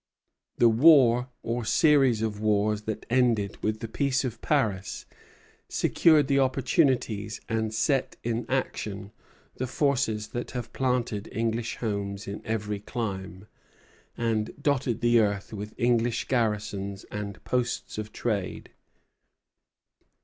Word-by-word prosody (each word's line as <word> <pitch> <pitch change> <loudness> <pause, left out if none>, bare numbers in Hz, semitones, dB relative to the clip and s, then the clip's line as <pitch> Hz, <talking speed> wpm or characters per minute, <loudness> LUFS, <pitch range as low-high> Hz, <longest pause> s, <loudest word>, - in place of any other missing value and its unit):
The 120 - +6
war 125 -1 +6
or 120 +1 -2
series 135 -3 +4
of 105 -2 -2
wars 105 0 +1
that 110 - -4
ended 115 -5 +1
with 110 +1 -1
the 115 - -3
Peace 135 +3 0
of 120 -3 -4
Paris 105 -11 -1 0.6
secured 155 -4 +4
the 140 0 +3
opportunities 130 -5 +1
and 110 -1 -1
set 130 +5 0
in 115 0 -2
action 105 -6 -3 0.5
the 130 - -2
forces 120 -6 0
that 120 -1 -4
have 120 - -6
planted 125 -5 -1
English 115 +1 -1
homes 100 -2 -3
in 100 +1 -5
every 105 -2 -2
clime, 95 -4 -5 0.7
and 110 -2 -1
dotted 130 -5 0
the 120 0 +4
earth 100 -1 0
with 105 0 -6
English 120 -1 +1
garrisons 105 -5 -1
and 105 -1 -6
posts 125 -3 -2
of 110 0 -5
trade. 105 -6 -3
115 Hz, 120 wpm, -27 LUFS, 105-125 Hz, 0.7 s, The